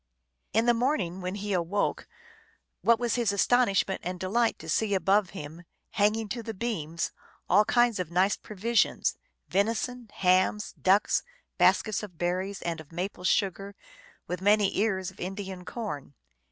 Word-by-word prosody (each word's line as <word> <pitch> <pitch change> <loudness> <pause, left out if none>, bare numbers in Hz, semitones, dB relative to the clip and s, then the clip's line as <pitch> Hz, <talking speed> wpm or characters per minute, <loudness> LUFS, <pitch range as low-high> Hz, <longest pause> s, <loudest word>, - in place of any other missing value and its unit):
In 225 +2 +2
the 240 - +5
morning, 230 - 0
when 185 +2 -3
he 205 0 -3
awoke, 180 +3 -1 0.7
what 235 0 +4
was 240 -2 0
his 235 -4 +1
aston 245 +5 +3
ishment 195 -1 0
and 180 0 -4
delight 225 +6 +1
to 160 - -11
see 205 +5 +1
above 195 +1 +2
him, 160 -2 -8 0.3
hanging 210 +2 +1
to 235 +3 -3
the 225 -1 -6
beams, 170 -7 -3 0.4
all 205 +4 +5
kinds 240 -3 +3
of 180 -3 -3
nice 185 +4 +2
provisions, 215 +2 0 0.3
venison, 230 +4 -1
hams, 190 +3 +2
ducks, 195 +3 +3 0.4
baskets 215 -2 +3
of 195 -6 -9
berries 185 +3 -2
and 170 -2 -3
of 155 - -17
maple 180 +2 -4
sugar, 195 +1 0 0.5
with 180 +1 -4
many 205 0 +3
ears 190 -3 0
of - - -22
Indian 190 -1 -5
corn. 150 - -6
200 Hz, 155 wpm, -28 LUFS, 180-220 Hz, 0.7 s, the